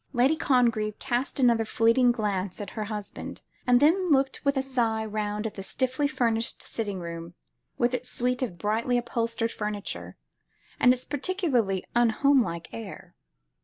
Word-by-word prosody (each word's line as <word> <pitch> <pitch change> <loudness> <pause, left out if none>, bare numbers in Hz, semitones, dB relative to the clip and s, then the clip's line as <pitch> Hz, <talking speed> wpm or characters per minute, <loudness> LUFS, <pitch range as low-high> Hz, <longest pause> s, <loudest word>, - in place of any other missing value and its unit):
Lady 260 +5 +4
Congreve 235 -8 +2
cast 265 +1 -2
another 235 -3 +4
fleeting 230 +3 +3
glance 200 -5 -2
at 205 -2 -6
her 215 -2 -4
husband, 210 -1 -6 0.2
then 305 +9 +4
looked 270 -2 +2
with 280 -1 +2
a - - +3
sigh 230 -4 0
round 210 0 -2
the 210 -2 -4
stiffly 260 +7 0
furnished 230 -5 -1
sitting 205 -4 -4
room, 170 0 -7 0.4
with 240 +1 +2
its 250 0 -3
suite 250 +1 -1
of 225 -9 -3
brightly 225 +6 0
upholstered 230 -1 -1
furniture, 210 -1 -5 0.6
and 250 - +6
its 255 0 -1
particularly 285 - 0
unhomelike 235 - +3
air. 225 -4 -8
235 Hz, 140 wpm, -27 LUFS, 210-255 Hz, 0.6 s, and